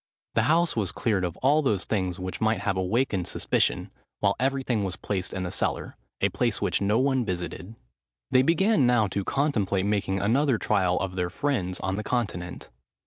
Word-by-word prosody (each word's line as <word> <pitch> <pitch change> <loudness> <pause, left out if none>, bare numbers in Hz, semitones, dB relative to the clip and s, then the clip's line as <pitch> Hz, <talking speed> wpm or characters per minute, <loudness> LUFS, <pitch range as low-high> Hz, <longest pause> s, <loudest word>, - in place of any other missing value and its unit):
The 110 - +3
house 170 +1 +3
was 105 -5 0
cleared 105 -5 0
of 90 -1 -3
all 145 +4 +4
those 105 -10 0
things 95 -4 -1
which 95 -1 -5
might 110 0 +1
have 95 - 0
awakened 95 0 0
suspicion, - - 0 0.3
while 100 -1 +2
everything 130 -4 0
was 95 -2 -2
placed 95 -3 -3
in 95 - -3
the 90 - -3
cellar,—a - - -2
place - - 0
which - - 0
no 105 +2 +2
one 130 0 +2
visited. 90 +2 -5 0.6
They 130 - +6
began 165 - +3
now 120 -3 +4
to 100 +1 -2
contemplate 105 -9 0
making 100 -2 0
another 125 +6 +2
trial 95 -4 +1
of 95 -1 -3
their 90 -1 0
friends 95 -4 -2
on 95 0 -2
the 105 - -3
Continent. 95 - -3
105 Hz, 180 wpm, -26 LUFS, 95-130 Hz, 0.6 s, They